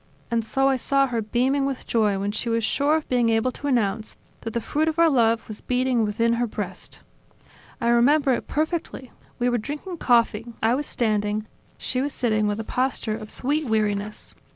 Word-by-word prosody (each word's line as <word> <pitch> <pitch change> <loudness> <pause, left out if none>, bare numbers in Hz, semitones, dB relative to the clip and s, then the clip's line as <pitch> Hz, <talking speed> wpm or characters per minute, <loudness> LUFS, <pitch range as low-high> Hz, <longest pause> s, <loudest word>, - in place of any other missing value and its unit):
And 230 -1 +1
so 270 +5 +1
I 270 -1 +3
saw 275 +2 +2
her 240 -4 -2
beaming 260 +6 +1
with 270 -2 -4
joy 210 -4 +1
when 200 +1 -1
she 230 +3 -3
was 230 0 0
sure 285 +7 +2
of 315 - -2
being 245 -2 +2
able 225 +3 +2
to 285 - -5
announce 220 -5 0 0.2
that 225 - -6
the 235 - 0
fruit 305 +7 -1
of 320 0 -1
our 335 -1 +5
love 230 -3 +2
was 215 - -7
beating 250 -2 +1
within 230 +2 +1
her 240 +1 0
breast. 200 -4 -6 0.8
I 235 - -1
remember 265 +4 +4
it - - -3
perfectly: 310 -5 -3 0.3
we 245 - 0
were 240 -1 +1
drinking 300 - -6
coffee, 235 -4 +2
I 225 +2 +2
was 285 +3 -2
standing, 210 -2 0 0.3
she 255 - -2
was 285 +1 -2
sitting 215 -4 +1
with 205 +1 -1
a - - -2
posture 250 -2 -1
of 215 -1 -8
sweet 295 +4 -1
weariness. 210 -1 -1
235 Hz, 200 wpm, -24 LUFS, 220-270 Hz, 0.8 s, our